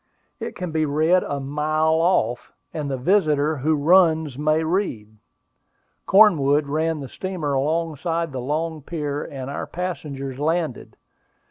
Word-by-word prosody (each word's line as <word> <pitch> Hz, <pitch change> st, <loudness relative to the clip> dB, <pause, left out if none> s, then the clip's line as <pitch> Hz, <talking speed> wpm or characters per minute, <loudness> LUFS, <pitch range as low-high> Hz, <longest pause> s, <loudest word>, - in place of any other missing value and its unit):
It -, -, -6 dB
can 180 Hz, -2 st, -5 dB
be 155 Hz, 0 st, 0 dB
read 160 Hz, +5 st, +3 dB
a 140 Hz, -, -3 dB
mile 155 Hz, +3 st, 0 dB
off, 125 Hz, -9 st, +1 dB, 0.2 s
and 150 Hz, -3 st, -3 dB
the 135 Hz, -, -2 dB
visitor 155 Hz, -1 st, +2 dB
"who 155 Hz, +4 st, +1 dB
runs 160 Hz, -2 st, +3 dB
may 155 Hz, +3 st, +1 dB
read." 160 Hz, -, -2 dB, 0.9 s
Cornwood 155 Hz, -8 st, +5 dB
ran 155 Hz, +2 st, -1 dB
the 135 Hz, -, -6 dB
steamer 175 Hz, -3 st, -4 dB
alongside 165 Hz, +3 st, -1 dB
the 130 Hz, -2 st, -4 dB
long 155 Hz, +4 st, -2 dB
pier, 145 Hz, -1 st, -4 dB
and 130 Hz, -2 st, -7 dB
our -, -, -4 dB
passengers 140 Hz, -7 st, -5 dB
landed. 160 Hz, -2 st, -2 dB
155 Hz, 135 wpm, -22 LUFS, 140-165 Hz, 0.9 s, Cornwood